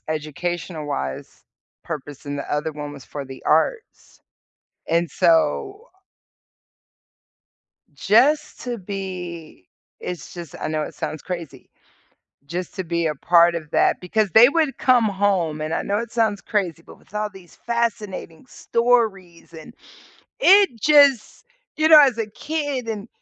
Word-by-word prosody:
educational-wise 155 - -4 0.4
purpose, 145 -3 -7
and 145 0 -5
the 140 - -6
other 150 +2 -1
one 145 -1 -7
was 140 -3 -11
for 145 -1 -7
the 135 0 -11
arts. 440 - -1 0.7
And 170 +1 +1
so 390 - +1 2.1
just 265 +9 +2
to 245 -2 -4
be 180 - -7 0.3
it's 175 -5 -7
just 170 -4 -9
I - - -3
know 155 0 -1
it - - -7
sounds 155 - -5
crazy. 165 -7 -7 0.8
Just 175 +5 -6
to 190 - -3
be 170 -1 -2
a 150 - -2
part 170 +3 +4
of 155 -3 -6
that - - +2
because 210 +3 0
they 235 +3 +8
would 310 -2 0
come 250 -3 +3
home- 190 -6 0
and 155 +1 -3
I - - 0
know 200 - -1
it 235 +2 -4
sounds 220 -3 0
crazy- 180 -6 -2
but - - -15
with - - -26
all 210 0 -2
these 190 -3 -16
fascinating 215 -7 -3
stories, 220 -11 -1
and 160 +8 -11 0.7
it 390 - +5
just 285 - +4 0.3
you 310 0 +3
know, 310 -1 +10
as 265 -5 +3
a 225 - -1
kid, 285 +1 -4
and 215 0 -5
185 Hz, 140 wpm, -22 LUFS, 160-235 Hz, 2.1 s, know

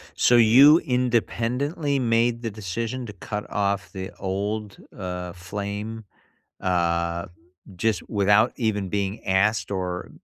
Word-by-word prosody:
So 120 - +4
you 130 +7 +8
independently 125 +4 0
made 115 0 +1
the 115 - -2
decision 110 +5 -4
to 105 - -8
cut 105 +1 -6
off 100 -1 -1
the 95 -1 -6
old, 100 +2 -3 0.2
uh, 90 -2 -5
flame, 100 +4 -6 0.6
uh, 85 -1 0 0.5
just 105 0 -1
without 105 +3 +3
even 105 -5 -1
being 100 +2 -3
asked 95 -1 +1
or, 90 -2 -3
105 Hz, 115 wpm, -24 LUFS, 95-115 Hz, 0.6 s, you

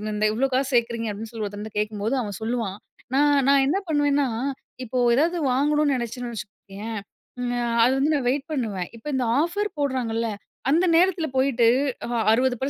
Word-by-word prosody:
இந்த 210 0 +1
இவ்ளோ 260 +5 +1
காசு 265 +1 +1
சேர்க்குறீங்க 230 -1 +1
அப்படின்னு 215 +3 -7
சொல்லி 220 -2 -4
ஒருத்தங்கிட்ட 210 +1 -7
கேட்கும்போது 210 +3 -1
அவன் 205 -5 -5
சொல்லுவான், 225 -4 -2 0.4
நான் 290 +1 +4 0.2
நான் 275 -1 +5
என்ன 350 +7 +2
பண்ண 310 -2 0
பண்ணுவேன்னா 285 -1 +2 0.6
இப்போ 255 +1 -4 0.2
ஏதாவது 330 +7 +2
வாங்கணுனு 295 +2 +2
நினைச்சேன்னு 240 0 -4
வச்சுக்கயே, 205 0 -8 0.9
அது 250 - +4
வந்து 285 +3 +2
நான் 265 -4 0
வெயிட் 270 +2 -1
பண்ணுவேன், 215 - -2
இப்போ 225 - -12
இந்த 260 - +1 0.2
ஆஃபர் 405 +5 -1
போடுறாங்கல்ல 240 -5 -1 0.4
அந்த 335 +6 +4
நேரத்தில 345 -2 +3
போயிட்டு 260 -3 +3 0.7
60% 250 +2 +3
250 Hz, 155 wpm, -24 LUFS, 225-285 Hz, 0.9 s, நான்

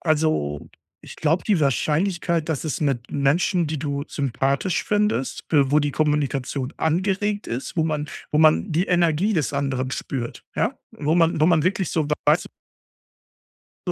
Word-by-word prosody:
Also, 155 - 0 0.3
ich - - -11
glaube, 160 +3 +1
die 200 -7 +2
Wahrscheinlichkeit, 165 +4 0
dass 160 -2 -2
es 155 - -3
mit 135 -5 -1
Menschen, 165 +5 +2
die 155 0 -3
du 140 0 -2
sympathisch 140 +5 -1
findest, 210 -9 0
w 145 -3 +5
wo 150 - +4
die 145 -1 0
Kommunikation 140 -3 -1
angeregt 195 +5 0
ist, 125 +8 -5
wo 160 - +2
man 150 -2 -2 0.2
wo 150 - +2
man 160 +4 +4
die 170 +4 +1
Energie 175 +3 +2
des 160 -8 0
anderen 135 -2 -1
spürt, 120 -4 -4
ja? - - 0
Wo 150 +2 -1
man 165 -2 +3
wo 155 - +5
man 165 -3 +4
wirklich 185 0 0
so 155 -3 0 0.2
weiß - - +3 1.4
so, - - +1
155 Hz, 160 wpm, -23 LUFS, 140-170 Hz, 1.4 s, w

